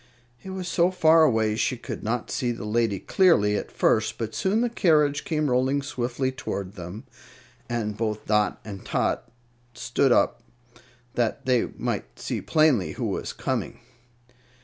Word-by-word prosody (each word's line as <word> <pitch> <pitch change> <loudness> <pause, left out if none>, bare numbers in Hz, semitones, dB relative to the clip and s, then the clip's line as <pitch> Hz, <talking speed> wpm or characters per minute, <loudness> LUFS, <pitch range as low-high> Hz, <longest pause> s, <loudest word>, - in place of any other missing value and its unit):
It 190 - -9
was 190 -1 -5
so 170 +1 +3
far 165 -3 +5
away 110 -7 +3
she 125 +3 0
could - - -7
not 115 +2 -2
see 120 -2 0
the 115 -3 -6
lady 110 -1 +1
clearly 105 - +3
at - - -3
first; 110 0 +1
but 110 -1 -4
soon 205 +4 +1
the 245 - +2
carriage 150 -9 +3
came 155 -2 0
rolling 130 +3 +1
swiftly 130 0 -2
toward 100 -8 -5
them, 90 +3 -8 0.7
and 110 -3 -2
both 110 -1 -3
Dot 105 -1 +1
and 100 -3 -8
Tot - - -1 0.5
stood 130 +1 +1
up 120 - +3 0.7
that 120 -2 -1
they 125 -2 +2
might - - -3
see - - -3
plainly 155 - +2
who - - -4
was - - -3
coming. - - -3
120 Hz, 155 wpm, -25 LUFS, 110-155 Hz, 0.7 s, far